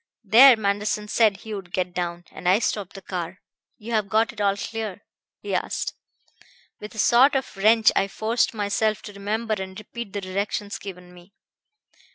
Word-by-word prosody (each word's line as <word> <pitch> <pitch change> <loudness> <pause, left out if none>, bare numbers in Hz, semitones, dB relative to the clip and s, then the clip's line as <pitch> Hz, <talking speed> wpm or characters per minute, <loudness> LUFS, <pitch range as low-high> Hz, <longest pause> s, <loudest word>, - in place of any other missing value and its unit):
There 235 +4 +8
Manderson 210 0 -1
said 215 -3 +3
he 220 - -7
would 190 -3 -7
get 180 -1 -2
down, 175 -1 -4
and 180 - -2
I 190 - +6
stopped 205 -3 -2
the 195 - -10
car. 180 -1 -5 0.4
'You've 215 -2 -2
got 220 +3 +2
it 215 - -7
all 200 -1 +2
clear?' 215 -2 -5 0.4
he - - -4
asked. - - -2 0.9
With 210 +1 -9
a - - -11
sort 250 +6 +5
of 265 -4 -2
wrench 220 +3 +5
I 195 - +2
forced 220 +4 0
myself 215 0 -1
to 205 - -9
remember 215 +3 -2
and 190 0 -7
repeat 215 0 -8
the 205 - -3
directions 200 +2 -3
given 180 -2 -10
me. 180 +2 -17
205 Hz, 175 wpm, -24 LUFS, 190-220 Hz, 0.9 s, There